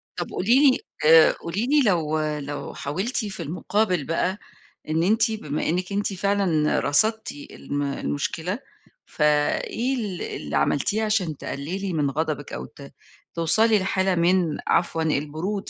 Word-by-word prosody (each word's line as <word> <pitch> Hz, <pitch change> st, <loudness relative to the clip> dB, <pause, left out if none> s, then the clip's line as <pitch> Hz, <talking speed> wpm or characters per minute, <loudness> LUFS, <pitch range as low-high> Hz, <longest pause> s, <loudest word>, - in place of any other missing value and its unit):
طب -, -, -4 dB
قولي 260 Hz, +8 st, +4 dB
لي -, -, -1 dB, 0.3 s
آآ 160 Hz, 0 st, +8 dB
قولي 190 Hz, +8 st, -3 dB
لي 295 Hz, +1 st, +4 dB
لو 155 Hz, -5 st, +1 dB
لو 150 Hz, -2 st, -4 dB
حاولتِ 190 Hz, -, -3 dB
في 190 Hz, -4 st, -6 dB
المُقابل 180 Hz, +1 st, 0 dB
بَقَى، 180 Hz, +5 st, -1 dB, 0.5 s
إن 160 Hz, +2 st, +1 dB
أنتِ 220 Hz, +4 st, +3 dB
بما 155 Hz, -10 st, -3 dB
إنِك 180 Hz, +3 st, -1 dB
أنتِ 200 Hz, 0 st, -1 dB
فعلًا 190 Hz, -5 st, +1 dB
رصدتِ 220 Hz, +10 st, +1 dB
الم 145 Hz, 0 st, -5 dB
المشكلة، 160 Hz, -, -3 dB, 0.5 s
ف -, -, -10 dB
إيه 150 Hz, -, +1 dB
ال 205 Hz, -7 st, -4 dB
اللي 75 Hz, -1 st, -5 dB
عملتيه 205 Hz, +10 st, +1 dB
عشان 190 Hz, -9 st, 0 dB
تقللي 180 Hz, +7 st, -4 dB
من 145 Hz, -3 st, +1 dB
غضبِك، 150 Hz, 0 st, -3 dB
أو 65 Hz, -, -5 dB
ت -, -, -13 dB, 0.4 s
توصلي 215 Hz, +6 st, +3 dB
لحالة 190 Hz, 0 st, +1 dB
من 170 Hz, -2 st, +2 dB
عفوًا 165 Hz, -2 st, +1 dB
البرود 160 Hz, +7 st, -2 dB
175 Hz, 140 wpm, -24 LUFS, 150-205 Hz, 0.5 s, آآ